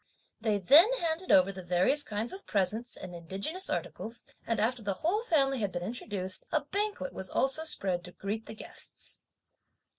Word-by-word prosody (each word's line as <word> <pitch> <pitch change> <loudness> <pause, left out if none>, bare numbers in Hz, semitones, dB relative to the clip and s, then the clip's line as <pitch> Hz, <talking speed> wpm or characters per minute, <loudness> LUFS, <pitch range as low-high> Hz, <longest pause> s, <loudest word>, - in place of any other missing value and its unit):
They 215 -2 +1
then 295 - +7
handed 340 -5 -1
over 185 +1 +6
the 190 -1 -8
various 180 +11 +3
kinds 215 - -3
of 390 - -10
presents 210 +5 +1
and 185 -1 -8
indigenous 195 - -2
articles, 230 +2 -4 0.2
and 230 - 0
after 235 +3 +1
the 200 -2 -2
whole 405 +6 +2
family 275 - +2
had 205 -3 -1
been 175 - -4
introduced, 190 -4 -3
a 310 - +2
banquet 400 -1 -3
was 190 -1 -4
also 270 - +1
spread 185 - 0
to 180 - -10
greet 210 +4 -5
the 220 - -8
guests. - - -8
220 Hz, 175 wpm, -30 LUFS, 190-300 Hz, 0.2 s, then